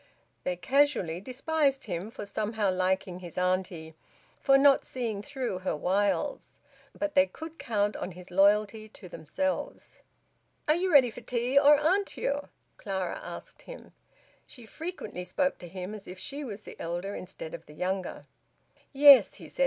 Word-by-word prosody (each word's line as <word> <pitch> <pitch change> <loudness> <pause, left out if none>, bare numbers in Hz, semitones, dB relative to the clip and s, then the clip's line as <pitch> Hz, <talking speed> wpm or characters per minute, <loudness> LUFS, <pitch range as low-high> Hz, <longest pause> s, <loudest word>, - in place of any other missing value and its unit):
They 180 - 0
casually 235 - +1
despised 270 +3 0
him 185 0 -4
for 225 - -8
somehow 210 0 -1
liking 185 0 -1
his 175 -2 -10
auntie, 180 -3 -1 0.5
for 275 -1 +5
not 275 0 +5
seeing 230 -5 -4
through 240 -4 -4
her 185 - -2
wiles; 200 - -1 0.4
but 300 -1 -2
they 280 0 +5
could 320 +2 -10
count 205 -2 0
on 180 - -5
his 180 +1 -12
loyalty 210 +3 +3
to 195 - -12
themselves. 280 - -4 0.7
"Are 305 - +5
you 360 +3 0
ready 260 -6 +6
for - - -10
tea, 245 +2 -2
or 290 +1 +6
aren't 375 +7 +1
you?" 285 +1 -2 0.3
Clara 190 -4 -3
asked - - -9
him. - - -12 0.5
She 245 -4 -13
frequently 310 - -6
spoke 275 +10 -1
to 175 - -9
him 185 +3 -6
as 210 -2 -9
if 180 - -8
she 285 +9 -6
was 215 -5 -7
the - - -11
elder 175 +4 -4
instead 170 -4 -8
of - - -9
the 150 - -13
younger. 185 +2 -3 0.7
"Yes," 280 -1 +8
he - - -11
said. - - -13
210 Hz, 160 wpm, -29 LUFS, 185-280 Hz, 0.7 s, Yes